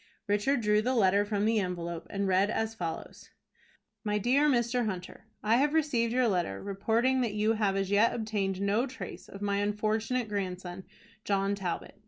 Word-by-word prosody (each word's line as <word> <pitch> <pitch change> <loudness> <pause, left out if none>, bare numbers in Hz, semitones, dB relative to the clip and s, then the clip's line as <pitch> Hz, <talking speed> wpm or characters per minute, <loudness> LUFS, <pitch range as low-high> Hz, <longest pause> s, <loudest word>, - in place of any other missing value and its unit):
Richard 210 +6 +1
drew 210 0 +3
the 255 +4 0
letter 200 -2 +4
from 205 0 0
the 225 0 +3
envelope, 170 -3 -4
and 200 0 -1
read 190 +2 +3
as 225 0 -1
follows: 170 -7 -6 0.7
"MY 210 -1 0
DEAR 265 +8 +3
MR. 240 -2 +1
HUNTER: 185 +1 -6 0.2
I 220 +2 +4
have 290 +4 +2
received 250 -7 +1
your 250 0 +3
letter, 175 - -1
reporting 225 +6 +1
that 225 -4 -1
you 215 +1 +2
have 210 -3 +1
as 195 0 -1
yet 210 +3 +4
obtained 205 -4 -2
no 205 +6 +1
trace 260 0 -8
of 200 +1 -8
my 200 -1 0
unfortunate 215 +4 0
grandson, 185 -2 -4 0.4
John 195 0 +1
Talbot. 195 0 -4
210 Hz, 175 wpm, -30 LUFS, 195-230 Hz, 0.7 s, letter